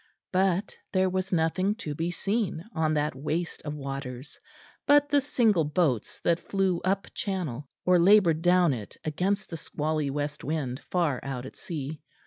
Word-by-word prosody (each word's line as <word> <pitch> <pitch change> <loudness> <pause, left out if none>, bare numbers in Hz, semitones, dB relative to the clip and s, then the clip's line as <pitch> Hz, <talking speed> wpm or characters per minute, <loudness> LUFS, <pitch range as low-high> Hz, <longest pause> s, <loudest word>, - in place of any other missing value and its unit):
But 190 +1 +1 0.2
there 185 -1 +3
was 185 0 -2
nothing 185 +4 +1
to 155 -10 -5
be 165 +3 -2
seen 195 -1 -1
on 155 -1 +1
that 150 0 +1
waste 155 +5 -3
of 150 -1 -5
waters 135 -1 -6 0.5
but 290 0 +5
the 285 -1 +4
single 225 - +3
boats 150 - 0
that 170 0 +3
flew 190 -3 0
up 195 +1 -1
channel 150 - -3 0.2
or 180 -1 +5
laboured 175 -3 +5
down 175 -3 +4
it 110 -5 -7
against 190 +6 -1
the 165 - -4
squally 155 -2 -2
west 145 +1 -3
wind, 140 -4 -2
far 165 -8 +1
out 130 -2 -5
at - - -9
sea. 155 -4 -6
165 Hz, 160 wpm, -28 LUFS, 145-190 Hz, 0.5 s, but